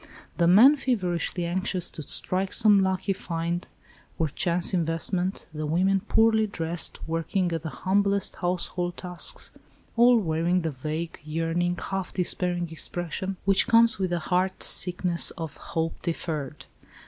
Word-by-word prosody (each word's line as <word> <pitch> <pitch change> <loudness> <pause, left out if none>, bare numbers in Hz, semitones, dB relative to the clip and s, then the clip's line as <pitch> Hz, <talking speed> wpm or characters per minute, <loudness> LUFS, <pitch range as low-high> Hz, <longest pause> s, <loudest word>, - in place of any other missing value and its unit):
The 170 - +3
men 240 - +7
feverishly 180 - -1
anxious 185 +1 -1
to - - -7
strike 185 +6 -2
some 205 -2 +5
lucky 190 +1 0
find 170 -1 -3 0.5
or 160 -2 0
chance 175 +4 0
investment, 175 +2 -1
the 155 0 -4
women 190 +5 +2
poorly 220 +1 +3
dressed, 170 -3 -2
working 170 +3 -1
at 165 -2 -2
the 160 - -5
humblest 200 +3 0
household 175 0 -2
tasks, 180 -1 -4 0.4
all 240 +1 +6
wearing 175 -1 +1
the 160 - -1
vague, 155 +5 -5
yearning, 165 +3 -1
half 195 0 -4
despairing 175 -2 -1
expression, 175 +3 -4
which 195 +2 +4
comes 230 -2 +5
of 190 -1 0
the 175 - 0
heart 185 +3 -1
sickness 180 -1 +3
of 160 -3 -6
"hope 165 0 -4
deferred." 155 -5 -4
175 Hz, 135 wpm, -26 LUFS, 165-195 Hz, 0.5 s, men